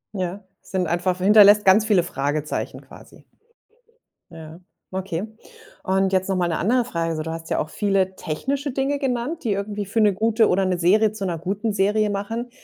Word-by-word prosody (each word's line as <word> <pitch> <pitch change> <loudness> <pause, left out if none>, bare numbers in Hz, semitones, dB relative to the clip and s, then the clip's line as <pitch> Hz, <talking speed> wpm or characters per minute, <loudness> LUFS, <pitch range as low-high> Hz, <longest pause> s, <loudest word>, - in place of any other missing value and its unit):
Ja, 185 +2 -4 0.2
sind 185 -2 -3
einfach 180 +2 -1
hinterlässt 205 +2 +6
ganz 200 +3 +5
viele 205 -5 +3
Fragezeichen 145 -1 -3
quasi. - - -16 1.1
Ja, 160 0 -11 0.3
okay. 190 -2 -4 0.6
Und 190 0 +1
jetzt 190 +1 +1
noch 190 - +1
mal 180 -1 +1
'ne 165 - -1
andere 240 +5 +1
Frage, 165 -7 -2
so: 155 - -3
Du 160 - -5
hast 165 0 -7
ja - - 0
auch 155 - -3
viele 195 0 0
technische 270 - -3
Dinge 275 +2 -1
genannt, 270 +4 -3
die 225 - -1
irgendwie 205 +1 -4
für 220 +4 0
'ne 210 -2 +4
gute 220 +2 +2
oder 190 +2 +2
'ne 185 -1 0
Serie 210 +5 +3
zu 215 -2 -5
'ner 175 -3 -2
guten 200 +6 -3
Serie 210 +2 +1
machen. 225 +5 -4
195 Hz, 185 wpm, -22 LUFS, 175-215 Hz, 1.1 s, hinterlässt